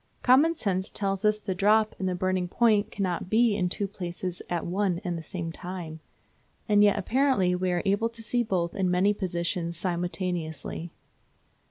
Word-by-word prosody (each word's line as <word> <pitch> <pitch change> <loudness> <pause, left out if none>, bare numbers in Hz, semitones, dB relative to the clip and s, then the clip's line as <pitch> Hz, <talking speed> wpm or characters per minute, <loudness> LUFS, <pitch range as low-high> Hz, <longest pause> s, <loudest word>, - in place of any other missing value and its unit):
Common 285 +7 +5
sense 190 - -1
tells 195 -1 -2
us 210 0 +3
the 205 -2 -4
drop 215 +3 +3
and 190 -1 0
the 180 - -1
burning 185 0 0
point 215 +1 +2
cannot 185 -3 -2
be 225 0 +3
in 180 -3 0
two 200 +2 -2
places 180 -2 -5
at 175 -1 -2
one 185 0 0
and 175 -3 -2
the 165 - -5
same 165 0 -4
time. 175 -2 -7 0.7
And 205 -1 +5
yet 205 -1 +4
apparently 220 -3 +2
we 180 0 0
are 175 -1 0
able 200 +4 +2
to 230 -1 -12
see 240 +3 +1
both 180 -7 -1
in 190 -2 0
many 185 +3 +3
positions 170 -3 -2
simultaneously. 175 -2 -3
185 Hz, 175 wpm, -27 LUFS, 175-210 Hz, 0.7 s, Common